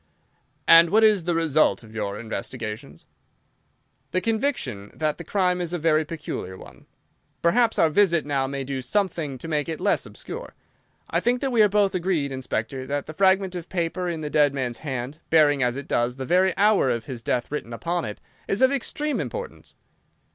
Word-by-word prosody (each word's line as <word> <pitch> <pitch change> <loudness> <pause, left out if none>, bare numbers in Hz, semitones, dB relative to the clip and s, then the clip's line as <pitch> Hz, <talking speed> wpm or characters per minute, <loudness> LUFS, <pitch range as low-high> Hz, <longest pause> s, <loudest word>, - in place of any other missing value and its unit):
"And 165 0 +8
what 220 +5 +4
is 210 -6 +4
the 175 -1 0
result 155 -5 +2
of 110 -1 -14
your 105 -2 -3
investigations?" 110 -1 -6 1.0
"The 185 - 0
conviction 215 - -2
that 155 0 -1
the - - -6
crime 180 0 +1
is 175 -1 -3
a - - 0
very 155 -1 +2
peculiar 150 - -6
one. - - -14 0.6
Perhaps 225 +7 +3
our 160 - +4
visit 170 -3 +3
now 140 -2 0
may 135 0 -4
do 135 0 -4
something 165 -2 -1
to 125 - -8
make 150 -1 -1
it 160 - -4
less - - +1
obscure. - - -9 0.6
I - - +2
think 245 +1 +1
that 270 - -1
we 235 -3 +4
are 210 - +6
both 200 -1 +2
agreed, 175 -6 0
Inspector 130 0 -3
that 145 0 -2
the 155 - -8
fragment 190 +2 +3
of 175 -2 -6
paper 180 0 -2
in 165 -2 -4
the 150 -1 -4
dead 145 -2 +3
man's 125 -3 -3
hand, 135 0 -5
bearing, 150 -3 +4
as 125 +1 +1
it 140 - -7
does, 120 +1 0
the 135 0 -5
very 185 +3 +2
hour 205 -8 +4
of 115 -2 -1
his 125 -4 -6
death 120 +2 -1
written 150 -5 -4
upon 170 +8 -2
it, 105 -4 -6 0.3
is 195 +6 +1
of 260 - +6
extreme 295 +2 -2
importance." 480 0 -6
160 Hz, 190 wpm, -24 LUFS, 130-190 Hz, 1.0 s, And